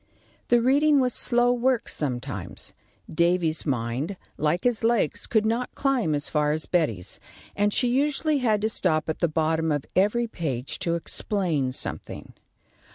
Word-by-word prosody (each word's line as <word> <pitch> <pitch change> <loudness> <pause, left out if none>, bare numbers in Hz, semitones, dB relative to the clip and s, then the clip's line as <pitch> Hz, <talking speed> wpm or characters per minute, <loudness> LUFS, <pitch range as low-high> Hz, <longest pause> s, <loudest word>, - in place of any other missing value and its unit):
The 240 -1 +3
reading 285 +3 +4
was 250 -2 +1
slow 245 0 +2
work 245 -1 +1
sometimes. 125 -5 -5 0.3
Davy's 170 -1 +1
mind, 130 +7 -2 0.2
like 155 +4 0
his 240 -2 0
legs, 225 -8 +1
could 220 -2 +2
not 235 +3 -1
climb 250 - +1
as 145 - -2
far 150 -1 +1
as 155 0 -3
Betty's, 115 - -1 0.4
and 205 0 +2
she 245 - +1
usually 290 +4 +1
had 220 -5 +1
to 220 - +1
stop 160 -7 0
at 160 - -2
the 170 - +2
bottom 160 0 0
of 145 -2 -1
every 210 +6 +2
page 140 - -4
to 170 -1 0
explain 170 -6 -1
something. - - -7
180 Hz, 155 wpm, -25 LUFS, 155-240 Hz, 0.4 s, reading